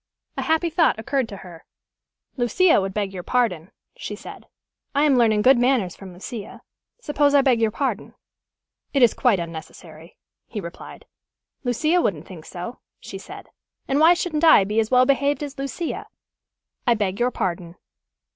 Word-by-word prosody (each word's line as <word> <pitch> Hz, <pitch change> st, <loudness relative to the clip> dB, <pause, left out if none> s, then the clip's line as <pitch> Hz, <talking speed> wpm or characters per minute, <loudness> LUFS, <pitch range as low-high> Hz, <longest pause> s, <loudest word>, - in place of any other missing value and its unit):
A -, -, -3 dB
happy 320 Hz, +1 st, 0 dB
thought 330 Hz, -6 st, +3 dB
occurred 255 Hz, +2 st, -1 dB
to 200 Hz, -, -8 dB
her. 170 Hz, -3 st, -12 dB, 0.7 s
"Lucia 260 Hz, -, +3 dB
would 190 Hz, 0 st, -3 dB
beg 200 Hz, -1 st, -3 dB
your 185 Hz, -, -5 dB
pardon," 185 Hz, -7 st, -1 dB, 0.3 s
she -, -, -6 dB
said. -, -, -11 dB, 0.5 s
"I 285 Hz, -, +3 dB
am 290 Hz, -3 st, +4 dB
learning 220 Hz, -4 st, +3 dB
good 260 Hz, 0 st, +6 dB
manners 245 Hz, -8 st, +1 dB
from 195 Hz, -2 st, -11 dB
Lucia. 200 Hz, +4 st, -9 dB, 0.4 s
Suppose 290 Hz, -8 st, +1 dB
I 280 Hz, -, +7 dB
beg 250 Hz, -4 st, +3 dB
your 225 Hz, -, +3 dB
pardon." 270 Hz, +5 st, -3 dB, 0.8 s
"It 270 Hz, -, +4 dB
is 235 Hz, -, +5 dB
quite 240 Hz, -8 st, +2 dB
unnecessary," 165 Hz, 0 st, -9 dB, 0.3 s
he 220 Hz, -, -6 dB
replied. 170 Hz, -2 st, -10 dB, 0.6 s
"Lucia 305 Hz, +8 st, +1 dB
wouldn't 170 Hz, -, -2 dB
think 165 Hz, -4 st, -11 dB
so," 180 Hz, +8 st, -7 dB, 0.2 s
she -, -, -9 dB
said. -, -, -11 dB, 0.4 s
"And 275 Hz, +1 st, +1 dB
why 330 Hz, +3 st, +6 dB
shouldn't 335 Hz, -3 st, -2 dB
I 315 Hz, -11 st, +7 dB
be 210 Hz, +3 st, -1 dB
as 220 Hz, -1 st, 0 dB
well 255 Hz, 0 st, +5 dB
behaved 280 Hz, +2 st, +1 dB
as 280 Hz, -1 st, -7 dB
Lucia? 275 Hz, +5 st, -4 dB, 0.8 s
I 240 Hz, -, +5 dB
beg 200 Hz, -3 st, -2 dB
your 245 Hz, +1 st, +2 dB
pardon." 175 Hz, -6 st, -4 dB
240 Hz, 165 wpm, -23 LUFS, 190-280 Hz, 0.8 s, I